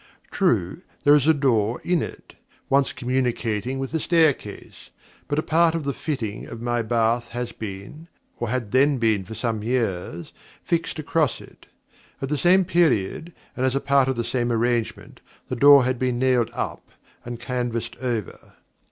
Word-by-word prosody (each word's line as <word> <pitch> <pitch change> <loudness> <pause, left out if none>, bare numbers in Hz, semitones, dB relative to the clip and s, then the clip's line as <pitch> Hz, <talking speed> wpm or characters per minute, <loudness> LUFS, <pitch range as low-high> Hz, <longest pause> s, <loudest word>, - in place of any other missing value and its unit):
True, - - 0 0.2
there 145 - +6
is 145 -1 +4
a - - +7
door 120 -5 +1
in 175 -2 +1
it, - - -8 0.4
once 140 0 +3
communicating 125 -2 -1
with 135 -1 -4
the 160 - -1
staircase; 160 -4 0 0.4
but 145 - -2
a 155 - +1
part 165 +1 +3
of 165 - -2
the 140 0 -2
fitting 115 -10 -4
of 115 - -8
my 120 0 -1
bath 115 +1 +1
has 120 0 -3
been 110 +10 -8 0.3
and 120 - -2
had 120 -4 -2
then 135 +2 +3
been 110 -4 +1
for 110 - -8
some 115 -1 -2
years 100 -8 -2 0.3
fixed 165 -1 -1
across 155 -2 0
it. - - -16 0.5
At 135 - -4
the 150 - 0
same 185 +4 +4
period, 165 - +1 0.2
and 130 - -2
as 130 0 +1
a - - +2
part 140 -1 +3
of 130 - 0
the 115 - -2
same 120 0 -1
arrangement, 120 0 -1 0.3
the 130 - -2
door 140 +2 +7
had 130 -1 -1
been 125 -1 0
nailed 125 -2 +2
up - - -4 0.3
and 120 -1 -7
canvassed 120 -2 -3
over. 120 -6 -5
125 Hz, 170 wpm, -23 LUFS, 115-145 Hz, 0.5 s, a